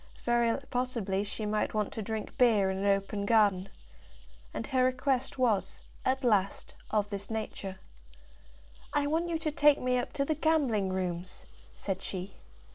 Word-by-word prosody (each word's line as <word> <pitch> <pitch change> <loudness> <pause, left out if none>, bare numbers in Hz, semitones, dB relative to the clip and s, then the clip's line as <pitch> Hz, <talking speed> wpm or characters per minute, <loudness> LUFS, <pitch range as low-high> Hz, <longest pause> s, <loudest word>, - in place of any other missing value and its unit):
Very 235 -1 +2
possibly 230 -6 0
she 210 +1 -4
might 210 +1 -1
want 210 -2 0
to 220 - -4
drink 220 +1 -4
beer 215 -6 +4
in 190 - -3
an 200 - 0
open 200 +1 +1
garden. 200 -3 +3 0.8
And - - -4
her 260 -2 +2
request 255 +1 0
was, 210 -7 +1 0.3
at 265 +1 0
last, 200 -5 +1 0.2
of 210 -1 0
this 200 0 -4
nature: 210 -3 -4 1.2
"I 290 -1 +2
want 325 +4 0
you 330 - 0
to 315 -1 -2
take 295 -1 +5
me 250 0 +1
up 245 - -4
to 275 - 0
the 310 - +1
gambling 280 -11 +2
rooms!" 185 -1 -4 0.3
said 190 -1 -3
she. 190 0 -5
220 Hz, 160 wpm, -30 LUFS, 195-255 Hz, 1.2 s, take